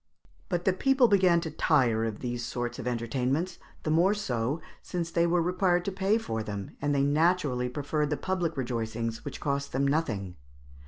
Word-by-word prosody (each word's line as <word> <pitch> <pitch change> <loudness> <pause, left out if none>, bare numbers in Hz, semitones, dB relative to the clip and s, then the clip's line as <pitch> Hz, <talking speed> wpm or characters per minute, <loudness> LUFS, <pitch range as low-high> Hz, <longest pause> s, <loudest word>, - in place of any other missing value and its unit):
But 175 -2 -1
people 270 -2 +5
began 185 -5 +4
to 160 - -4
tire 125 -8 +2
of 110 -2 -4
these 120 -1 -3
sorts 120 0 -3
of - - -4
entertainments, 125 +8 -1 0.2
the 155 - 0
more 180 +6 +4
so 130 - -1 0.3
as 170 -2 -1
they 170 0 +2
were 170 0 +2
required 180 0 +1
to 200 - -1
pay 195 +3 +2
for 110 - -3
them, 100 -2 -6
and 145 0 +1
they 140 - +3
naturally 145 -4 +2
preferred 145 +3 -1
the 150 - 0
public 175 -2 -2
rejoicings, 115 -2 -3
which - - -6
cost 140 -1 -2
them 135 +2 +2
nothing. 115 - -1
145 Hz, 175 wpm, -28 LUFS, 120-175 Hz, 0.3 s, people